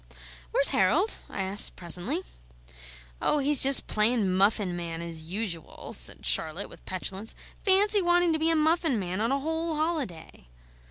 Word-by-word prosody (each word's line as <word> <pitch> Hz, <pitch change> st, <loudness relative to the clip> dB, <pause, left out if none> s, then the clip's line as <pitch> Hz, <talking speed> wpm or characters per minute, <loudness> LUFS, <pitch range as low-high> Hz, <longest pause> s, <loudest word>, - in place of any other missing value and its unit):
"Where's -, -, +4 dB
Harold;" 315 Hz, -, +1 dB
I 195 Hz, -, -4 dB
asked 195 Hz, +2 st, +2 dB
presently. 180 Hz, -, -1 dB, 1.0 s
"Oh, -, -, +1 dB
he's 285 Hz, 0 st, +4 dB
just 275 Hz, 0 st, +8 dB
playin' 215 Hz, -3 st, +1 dB
muffin 195 Hz, -1 st, +1 dB
man, 170 Hz, -1 st, -6 dB
as 170 Hz, -1 st, -5 dB
usual," 190 Hz, -6 st, -5 dB
said -, -, -1 dB
Charlotte 155 Hz, -, 0 dB
with -, -, -16 dB
petulance. 190 Hz, +3 st, -3 dB, 0.3 s
"Fancy 405 Hz, +1 st, +3 dB
wanting 350 Hz, -1 st, +2 dB
to 315 Hz, -, -2 dB
be 320 Hz, +1 st, +1 dB
a 330 Hz, -, +2 dB
muffin 315 Hz, -3 st, +1 dB
man 185 Hz, 0 st, -4 dB
on 230 Hz, +3 st, 0 dB
a 275 Hz, -, 0 dB
whole 320 Hz, +2 st, -3 dB
holiday!" 285 Hz, -, -5 dB
225 Hz, 155 wpm, -26 LUFS, -, 1.0 s, just